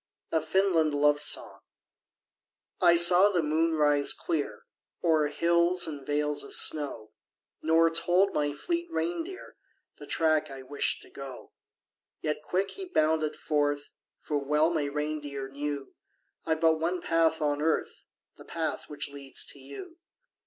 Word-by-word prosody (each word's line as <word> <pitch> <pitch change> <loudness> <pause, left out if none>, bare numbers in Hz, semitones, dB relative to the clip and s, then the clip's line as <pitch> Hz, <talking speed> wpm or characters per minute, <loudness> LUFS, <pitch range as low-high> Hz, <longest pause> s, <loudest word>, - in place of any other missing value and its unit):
A 160 - +2
FINLAND 160 -2 +2
LOVE 145 0 +3
SONG. - - 0 1.2
I 175 -2 +6
saw 175 +3 +6
the 180 -5 0
moon 160 +2 +1
rise 145 -2 +3
clear 160 -4 -3 0.4
O'er 160 -3 +3
hills 170 +3 +2
and 145 -4 -7
vales 150 0 -1
of - - -4
snow 145 -8 +1 0.5
Nor 165 +1 +3
told 175 +4 +2
my 145 -1 0
fleet 340 - -3
reindeer 345 +2 -4 0.4
The - - -10
track 155 -2 +1
I 135 -1 -9
wished 145 +2 -1
to - - -17
go. 135 -2 -9 0.7
Yet 150 -1 -2
quick 185 +5 -1
he 390 - -7
bounded 155 - +1
forth; 145 -1 -1 0.3
For 145 -2 -3
well 150 +3 +2
my 155 -4 0
reindeer 145 -1 -4
knew 140 0 -5 0.5
I've 160 -1 0
but 160 -1 +4
one 175 +3 -1
path 165 -1 +1
on 145 -1 0
earth 160 +1 -1 0.4
The - - -13
path 160 -1 -3
which 145 -1 -4
leads 140 -1 -3
to 140 - -15
you. 140 - -10
155 Hz, 145 wpm, -28 LUFS, 145-170 Hz, 1.2 s, I